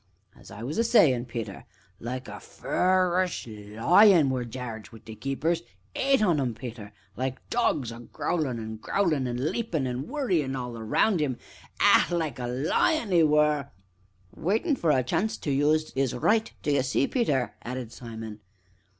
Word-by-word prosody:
As - - -15
I 110 - -9
was 145 - -3
a - - +4
sayin', 140 - +4
Peter 115 -5 -6 0.3
like 125 +2 -5
a - - -8
fur'us 185 0 0
lion 130 - +4
were 130 -1 -1
Jarge 115 -2 -7
wi' 115 - -12
they 110 - -8
keepers 150 +8 -1 0.3
eight 270 -4 +2
on 170 -8 +2
'em, 120 -4 -2
Peter 115 -3 -8 0.2
like 130 +1 -4
dogs, 145 - +1
a 115 - -9
growlin' 130 +2 -2
an' 110 0 -6
growlin', 155 - 0
an' 120 0 -3
leapin', 175 - -2
and 125 +2 -3
worryin' 180 - 0
all 125 -2 -4
round 115 - +1
'im 130 -5 -1 0.4
ah! - - +6
like 160 -7 -2
a 120 - -3
lion 170 - +1
'e 170 - +6
were 150 -2 +3 0.3
" 95 -1 -30
"Waitin' 225 - 0
for 170 - -1
a 130 -4 +3
chance 215 - -1
to 145 - -3
use 150 +3 +2
'is 135 -2 -1
'right, 220 - +2
d'ye 140 -2 +2
see, 135 +1 +1
Peter!" 145 - 0
added 125 -1 -6
Simon. 110 -3 -8
135 Hz, 165 wpm, -27 LUFS, 120-175 Hz, 0.4 s, ah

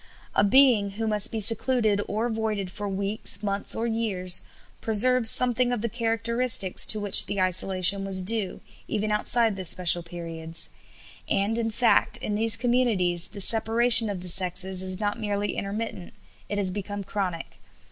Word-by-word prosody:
A - - +1
being 210 -3 +2
who 225 - -4
must 210 0 +3
be 225 - -5
secluded 220 -1 +1
or 215 +3 -4
avoided 220 -5 -5
for 205 +2 -7
weeks, 200 +1 -2
months, 200 0 -1
or 225 - -4
years 210 -6 +1 0.4
preserves 230 +2 +5
something 250 0 +2
of 245 -3 -4
the 235 - -4
characteristics 230 -3 +2
to 215 - +1
which 205 -2 +4
the 200 0 -4
isolation 185 +1 +1
was 190 -1 +2
due, 210 -1 -1 0.3
even 215 0 -4
outside 225 +1 0
those 185 -3 -3
special 175 -1 +4
periods. 165 -1 -5 0.6
And, 210 +4 -1
in 225 -1 -3
fact, 235 +2 0
in 210 - -6
these 220 0 +5
communities, 225 -8 -2
the 205 - -11
separation 225 +2 +4
of 185 -3 -7
the 180 - -8
sexes 185 +1 -2
is 185 0 -3
not 210 +1 -4
merely 205 -1 -4
intermittent; 200 -2 -7 0.3
it 205 - -5
has 195 -2 0
become 205 +1 -7
chronic. 185 -4 -7
205 Hz, 160 wpm, -23 LUFS, 190-225 Hz, 0.6 s, preserves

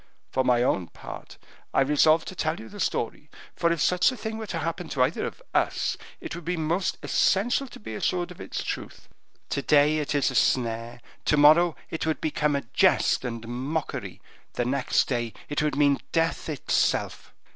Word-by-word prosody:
For 130 - +1
my 125 -1 +3
own 95 -8 +1
part, - - -10 0.4
I - - +5
resolved 155 +3 +4
to 185 - -9
tell 155 -1 -1
you 110 - -10
the - - -11
story; - - -2 0.3
for 170 - +2
if 170 - 0
such 180 - +3
a 255 - -7
thing 220 -1 -5
were 220 - -6
to 170 - -3
happen 165 +1 -3
to 130 - +2
either 135 +7 0
of - - -10
us, - - +1 0.2
it - - -6
would 170 +1 -7
be 180 +2 -2
most 165 +4 0
essential 240 +8 +2
to - - -12
be 110 +1 -7
assured 175 +10 -1
of 180 - -11
its - - -4
truth; - - -6 0.4
to 140 - -1
day 150 +2 +4
it 150 0 -2
is 140 - +2
a - - -6
snare, 120 -1 +1 0.2
to 150 - +3
morrow 155 +3 +6 0.2
it 160 - -3
would 160 - 0
become 150 -1 0
a 140 - -1
jest - - +3
and 115 -2 -5
mockery, 135 +6 -4 0.3
the 120 - -1
next 130 +1 +1
day 120 -4 -2 0.2
it 145 - 0
would 150 -2 0
mean 140 -1 +3
death 165 0 0
itself." 150 -4 0
150 Hz, 195 wpm, -26 LUFS, 130-170 Hz, 0.4 s, morrow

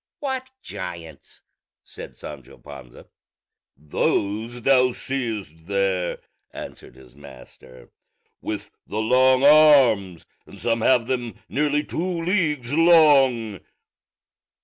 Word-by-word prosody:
"What 265 -3 -4
giants?" 85 -4 -10 0.4
said - - -12
Sancho 70 -4 -11
Panza. 65 -4 -13 0.7
"Those 105 - -2
thou 130 -1 +3
seest 110 - -5
there," 95 -3 -1 0.3
answered - - -11
his 65 -2 -18
master, 65 -2 -16 0.5
"with 105 -1 -6 0.2
the 105 - -6
long 130 +4 +3
arms; 135 - +5 0.2
and - - -14
some 115 -1 -1
have 125 0 +3
them 120 -2 -3
nearly 150 +1 0
two 170 +1 -4
leagues 150 -9 -1
long." 140 - +4
120 Hz, 100 wpm, -22 LUFS, 90-145 Hz, 0.7 s, arms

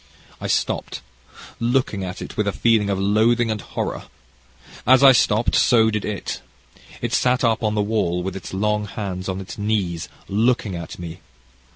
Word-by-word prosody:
I - - -3
stopped, - - -1 0.6
looking 120 -4 0
at 90 +1 -5
it - - -9
with 105 - 0
a - - +2
feeling 110 -1 +2
of 100 - 0
loathing 110 +4 +2
and 105 -2 -3
horror. - - -4 0.8
As 130 +2 +6
I 135 - +10
stopped 115 -2 +2
so 110 -3 +4
did 105 -1 -2
it. 105 -2 -4 0.6
It - - -2
sat 125 0 +2
up 115 -2 +2
on 105 -1 0
the 105 - +2
wall 95 -5 0
with 95 0 -4
its 95 - -7
long 105 +2 0
hands 95 -2 -5
on 95 0 -3
its 95 +1 -8
knees 100 -6 -1 0.2
looking 110 -1 +1
at 85 -1 -7
me. 85 0 -8
105 Hz, 175 wpm, -22 LUFS, 95-115 Hz, 0.8 s, I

